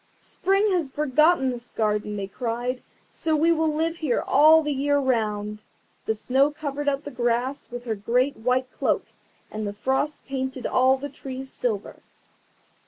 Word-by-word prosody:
"Spring 390 +2 +1
has 340 -7 0
forgotten 300 0 +3
this 240 0 -7
garden," 210 -1 -1
they 200 - -3
cried, 240 +4 -3 0.3
"so 320 -1 0
we 325 +3 +3
will 320 -1 +2
live 325 +2 -1
here 300 -7 0
all 310 +3 +6
the 295 - -1
year 285 +1 +1
round." 215 -5 -1 0.5
The 220 - +1
Snow 265 +6 +2
covered 290 -1 -3
up 275 +1 -2
the 290 - -7
grass 245 +2 -1
with 245 0 -7
her 230 -2 -2
great 245 +7 +1
white 250 +3 +1
cloak, - - +1 0.5
and 215 -1 -4
the 205 - -4
Frost 265 +7 -1
painted 265 -2 -4
all 260 +1 +3
the 280 +2 -5
trees 265 -1 -8
silver. 215 -5 -3
265 Hz, 165 wpm, -25 LUFS, 240-295 Hz, 0.5 s, all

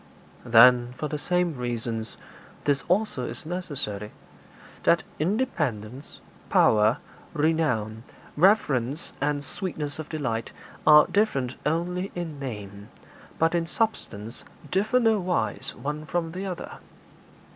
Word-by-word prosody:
'Then, 120 +1 +6
for 150 - -2
the 150 0 -4
same 180 0 0
reasons, 115 -2 -4 0.5
this 140 -2 +1
also 185 -7 +1
is 120 +6 -7
necessary 145 - -4 0.7
that - - +3 0.2
independence, 150 - -2 0.3
power, 110 +2 +4 0.4
renown, 150 -9 0 0.3
reverence, 150 - +2
and 145 0 0
sweetness 155 -5 -5
of 155 - -6
delight, 125 -8 -2 0.4
are 150 -1 +9
different 140 - +1
only 180 +4 -1
in 165 -5 -5
name, 105 -6 -7 0.5
but 165 +1 +2
in 170 -1 0
substance 120 - -3 0.3
differ 210 +7 +2
no 225 -3 +3
wise 180 -1 -1
one 150 +2 -4
from 165 -1 -1
the 190 +3 -4
other.' 180 -2 -6
150 Hz, 115 wpm, -26 LUFS, 120-175 Hz, 0.7 s, are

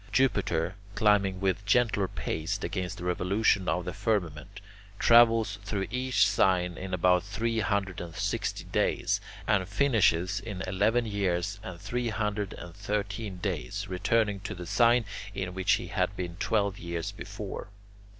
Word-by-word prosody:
Jupiter, 90 -10 +1 0.2
climbing 100 -3 +3
with 95 +1 0
gentler 105 -2 +2
pace 80 -3 -3
against 90 -2 -3
the - - -7
revolution 95 +2 +1
of 90 +1 0
the 90 - -4
firmament, 95 -3 -2 0.4
travels 115 -3 +5
through 100 -1 -2
each 130 +1 +2
sign 90 -2 +2
in 95 0 -6
about 90 0 +3
three 115 +4 -2
hundred 100 -2 -1
and 85 -2 -8
sixty 100 +1 -2
days, - - 0 0.2
and 100 -3 +1
finishes 100 -7 +2
in 100 -2 -6
eleven 105 +6 +2
years 100 -2 -1
and 95 -5 -8
three 120 +3 -2
hundred 105 -2 -2
and 85 - -9
thirteen 100 0 -3
days, 90 - -3
returning 100 +2 +1
to 95 - -6
the 90 0 -7
sign 120 +4 +4 0.3
in 90 -1 -3
which 95 0 +2
he - - -1
had 100 - 0
been 90 -2 -4
twelve 100 -1 0
years 85 -1 -4
before. - - -7
100 Hz, 150 wpm, -29 LUFS, 90-110 Hz, 0.4 s, travels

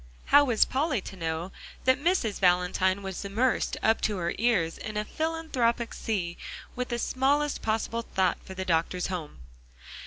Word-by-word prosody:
How 285 +1 +7
was 235 -5 +4
Polly 270 -2 0
to 190 - -9
know 165 +1 -3 0.3
that 260 +2 +3
Mrs. 335 - +1
Valentine 185 +1 +2
was 190 0 -5
immersed 225 +6 0
up 225 0 +3
to 210 -2 0
her 170 -1 -1
ears 200 -9 +1
in 215 -1 -5
a 210 - -1
philanthropic 275 -7 -1
sea 180 -6 -2 0.4
with 250 0 -3
the 240 - -1
smallest 280 +4 +1
possible 225 +1 -1
thought 190 -5 0
for 190 - -9
the 190 0 -4
doctor's 175 +1 0
home? 155 - -6
215 Hz, 160 wpm, -28 LUFS, 185-255 Hz, 0.4 s, How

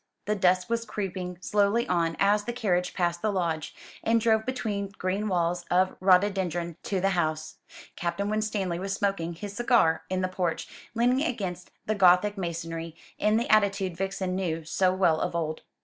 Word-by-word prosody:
The 210 - +1
dusk 185 -2 +2
was 230 0 -1
creeping 185 -4 -4
slowly 205 +4 +2
on 165 -2 0
as 205 +1 +3
the 240 - -3
carriage 185 -7 0
passed 175 -1 0
the 215 - +1
lodge, 165 -5 -2 0.3
and 230 0 +3
drove 220 0 +2
between 215 -6 -2
green 195 +3 -1
walls 175 -2 0
of 185 +1 +2
rhododendron 180 -3 +2
to 195 - -1
the 195 +2 +2
house. 155 -3 -1 0.4
Captain 175 +4 -2
Winstanley 210 -4 -1
was 195 +1 -3
smoking 195 -4 -1
his 200 +4 -7
cigar 235 -8 +3
in 185 0 -1
the 185 - +1
porch, 180 -2 -2 0.3
leaning 245 +3 +3
against 190 - -3 0.2
the 215 - 0
Gothic 195 +1 +4
masonry, 165 -3 -4 0.2
in 215 +1 +3
the 235 - 0
attitude 200 -4 +2
Vixen 190 0 -2
knew 165 -4 -2
so 185 +3 +2
well 185 -4 +2
of - - -2
old. 160 -2 -2
185 Hz, 170 wpm, -27 LUFS, 175-210 Hz, 0.4 s, Gothic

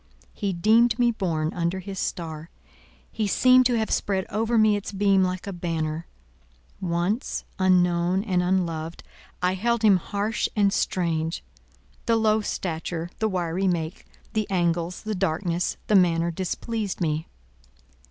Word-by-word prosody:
He 200 -2 -2
deemed 220 +6 +4
me 240 -1 +3
born 165 -7 -1
under 170 +1 -1
his 190 0 -6
star: 160 -1 -4 0.6
he 215 -2 -1
seemed 255 +4 +5
to 245 -2 +1
have 220 -1 -1
spread 190 -2 0
over 225 +3 +1
me 215 -1 +5
its 205 -1 -4
beam 195 -1 +3
like 185 -1 -2
a 200 - -5
banner. 165 -2 -3 0.7
Once—unknown, 180 -1 +1
and 185 -5 +1
unloved, 170 -3 -1 0.4
I 180 +1 +3
held 235 +4 0
him 205 -3 +6
harsh 205 +4 -2
and 200 -2 +3
strange; 165 -2 -1 0.6
the 230 - +4
low 220 -1 +3
stature, 170 -3 -4
the 220 - +1
wiry 180 0 -1
make, 170 -1 -2 0.3
the 215 -1 -1
angles, 175 -1 0
the 215 0 -2
darkness, 175 -2 -1
the - - 0
manner, 170 -3 +4
displeased 200 +4 -3
me. 155 -1 -1
185 Hz, 140 wpm, -25 LUFS, 170-210 Hz, 0.7 s, him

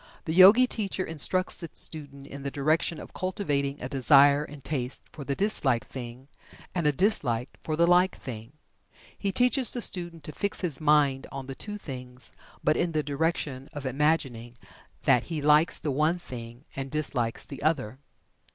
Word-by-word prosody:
The 160 - -2
Yogi 195 +8 +8
teacher 200 -6 -2
instructs 175 +4 +1
the 170 - -7
student 140 -3 -7
in 140 0 -9
the 140 - -3
direction 155 +3 0
of - - -11
cultivating 145 -7 -2
a 125 - -5
desire 140 +2 +5
and 145 -2 -11
taste 130 -3 -3
for 150 - -9
the 140 0 -2
disliked 140 - +1
thing, 125 +1 -8 0.5
and 170 -4 0
a - - +5
dislike 135 - +1
for 155 - -2
the 170 +2 +4
liked 180 +2 +3
thing. 115 0 -8 0.6
He 200 - -2
teaches 250 +4 +2
the 245 - +1
student 170 -3 -2
to 155 - -7
fix 200 +5 -2
his 165 -6 0
mind 145 -3 +3
on 135 -1 -6
the 135 - -6
two 210 +9 -7
things, 125 - -8 0.3
but 155 - +3
in 170 -1 -1
the 155 -1 0
direction 145 -2 -2
of 145 -2 -7
imagining 130 -4 -1 0.5
that 125 -3 +3
he 165 -3 -4
likes 150 +3 +4
the 150 - -2
one 155 +5 +1
thing 120 -4 -10
and 135 0 -5
dislikes 130 -6 0
the 140 - -9
other. 135 -6 -1
145 Hz, 175 wpm, -27 LUFS, 135-170 Hz, 0.6 s, Yogi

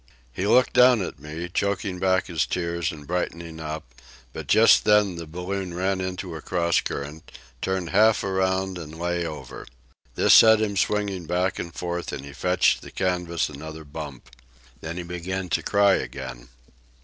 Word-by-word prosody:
He 95 +10 -2
looked 125 +4 +4
down 125 -4 +6
at 80 - -7
me, 80 +4 -6
choking 95 0 -2
back 95 0 +2
his 85 -4 -1
tears 85 -2 -2
and 75 -2 -11
brightening 85 -1 -4
up, 75 -5 -6 0.4
but - - -7
just 115 +1 +6
then 105 -3 +4
the 85 -1 -7
balloon 90 +2 -4
ran 95 +1 0
into 95 -1 -4
a 80 - -7
cross 85 +1 +1
current, 75 +3 -6 0.3
turned 95 -3 -2
half 110 +2 +4
around 95 -1 0
and 80 -1 -9
lay 85 0 -1
over. 75 -2 -8 0.5
This - - +5
set 110 -1 +8
him 105 -2 -1
swinging 100 -3 -1
back 90 +2 0
and 85 - -5
forth, 85 0 -4
and 70 - -6
he 70 - -10
fetched 90 +4 +2
the - - -10
canvas 90 -2 -1
another 80 +2 -8
bump. 70 -4 -9 0.5
Then 80 +2 -6
he 90 - -4
began 90 +2 -4
to - - +1
cry 100 -1 +4
again. 65 -3 -7
90 Hz, 170 wpm, -25 LUFS, 80-95 Hz, 0.5 s, set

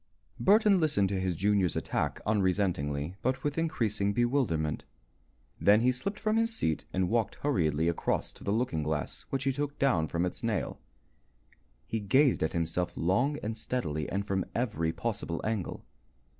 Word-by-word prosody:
Burton 205 -1 +5
listened 120 - +2
to 95 -1 -1
his 95 -2 -1
junior's 100 -1 +2
attack - - -1
unresentingly 90 -6 0
but 130 +1 -1
with 145 -1 -1
increasing 110 -11 0
bewilderment. 120 - 0 0.8
Then 105 +2 +5
he 125 +2 +4
slipped 200 +12 -4
from 215 0 +1
his 225 0 +2
seat 80 - 0
and 95 -1 +1
walked 115 +1 0
hurriedly 80 - +1
across 85 - -1
to - - -13
the - - -3
looking 110 -8 0
glass, 75 0 -3
which 135 -1 -1
he 135 - +2
took 145 +1 -3
down 95 -13 +2
from 85 +3 0
its 90 - -4
nail. 115 -4 -2 1.1
He 110 - -2
gazed 130 +7 +3
at 80 - 0
himself 85 +1 -1
long 120 - +1
and 110 +1 -2
steadily 95 - -3
and 100 +1 -2
from 95 -2 0
every 105 -10 0
possible 100 -4 -3
angle. 110 -5 -3
105 Hz, 160 wpm, -30 LUFS, 85-130 Hz, 1.1 s, Burton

